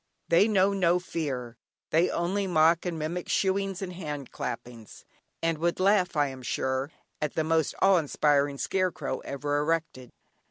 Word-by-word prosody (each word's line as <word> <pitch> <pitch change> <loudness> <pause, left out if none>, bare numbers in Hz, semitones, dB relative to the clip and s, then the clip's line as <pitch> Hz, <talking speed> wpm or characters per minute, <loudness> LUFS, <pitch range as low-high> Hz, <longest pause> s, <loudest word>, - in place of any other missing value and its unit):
They 170 +5 +5
know 200 -2 +3
no 180 -3 +3
fear; 135 -9 -4 0.3
they 165 +3 +3
only 190 +4 -1
mock 165 0 +3
and 170 -2 -3
mimic 165 +3 -4
"shooings" 195 0 0
and 180 -1 -5
hand 150 -6 -6
clappings, 115 -2 -7 0.4
and 165 -2 0
would 170 +2 0
laugh, 185 -2 +3
I 145 -2 +2
am 130 -1 -9
sure, 130 +3 -2 0.3
at 150 -2 -2
the 160 - +1
most 160 -1 +1
awe 195 -1 +6
inspiring 145 -2 +1
scare 185 +4 0
crow 140 -5 -4
ever 145 +1 -2
erected. 150 -5 -2
165 Hz, 160 wpm, -28 LUFS, 145-180 Hz, 0.4 s, awe